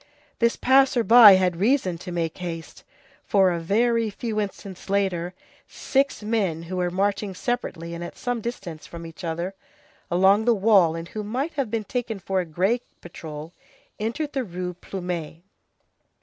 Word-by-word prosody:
This 235 0 +3
passer 265 -2 +4
by 225 -3 +9
had 185 -2 +2
reason 195 -4 +1
to 180 - -7
make 165 -1 -3
haste, 165 -2 -7 0.4
for 190 -2 +3
a 170 - -1
very 230 +6 +1
few 215 +1 -3
instants 195 -2 -6
later, 185 -3 0 0.3
six 275 -4 -1
men, 200 -7 -1
who 185 +2 -5
were 180 -1 0
marching 195 +1 -1
separately 180 -8 -3
and 170 0 -5
at 175 - -8
some 245 -2 -2
distance 195 -9 -6
from 170 -1 -9
each 165 +2 -11
other, 170 +3 -3 0.6
along 190 +5 +4
the 240 -1 +4
wall, 195 -5 +4
and 165 +1 -6
who 215 - -5
might 260 +10 -3
have 275 -6 -2
been 225 0 -2
taken 225 0 -3
for 190 0 -2
a 180 - -1
gray 190 +9 0 0.2
patrol, 160 -1 -9 0.5
entered 235 +8 -3
the 270 -2 -1
Rue 180 -3 -5
Plumet. 175 -3 -6
195 Hz, 165 wpm, -24 LUFS, 175-230 Hz, 0.6 s, by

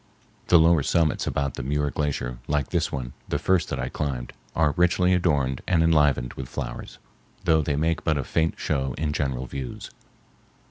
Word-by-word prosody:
The 90 - +7
lower 80 -1 +5
summits 80 +2 +1
about 70 -2 -1
the - - -5
Muir 75 +2 -1
Glacier, 65 -5 -2
like 75 -2 0
this - - 0
one, 65 -3 -4 0.2
the - - +1
first 95 -2 +1
that - - -3
I - - -2
climbed, 65 -4 -3 0.2
are 80 -3 +3
richly 90 +1 +3
adorned 70 -8 +1
and 85 -3 +3
enlivened 75 -6 +3
with 65 -2 -7
flowers, - - -6 0.5
though 80 -1 +4
they 75 -1 -1
make 80 +3 0
but 80 -2 +1
a 70 - -1
faint 80 +5 0
show 65 -4 -1
in 75 -1 -1
general 65 -4 -1
views. 65 -1 -6
75 Hz, 180 wpm, -25 LUFS, 65-80 Hz, 0.5 s, The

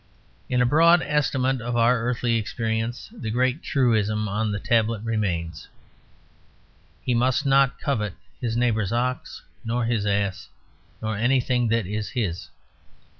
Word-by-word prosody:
In 125 -1 +2
a - - +3
broad 165 +6 +5
estimate 135 -3 0
of 120 +1 -3
our 120 +1 +4
earthly 120 0 0
experience, 115 - -3
the 165 - -5
great 125 +5 +1
truism 110 -5 +1
on 105 +1 -1
the 100 - -2
tablet 115 -1 +1
remains: 90 -8 -2 1.4
he 125 - +1
must 125 +2 +1
not 135 -1 +3
covet 105 -9 -2 0.2
his 120 -3 -2
neighbour's 110 -5 +1
ox 125 +2 -2 0.2
nor 115 +1 -1
his 115 -3 0
ass 100 -2 -1 0.5
nor 110 0 -1
anything 125 +1 +1
that 115 -1 +1
is 105 +2 -3
his. 100 -10 -3
115 Hz, 135 wpm, -24 LUFS, 110-125 Hz, 1.4 s, broad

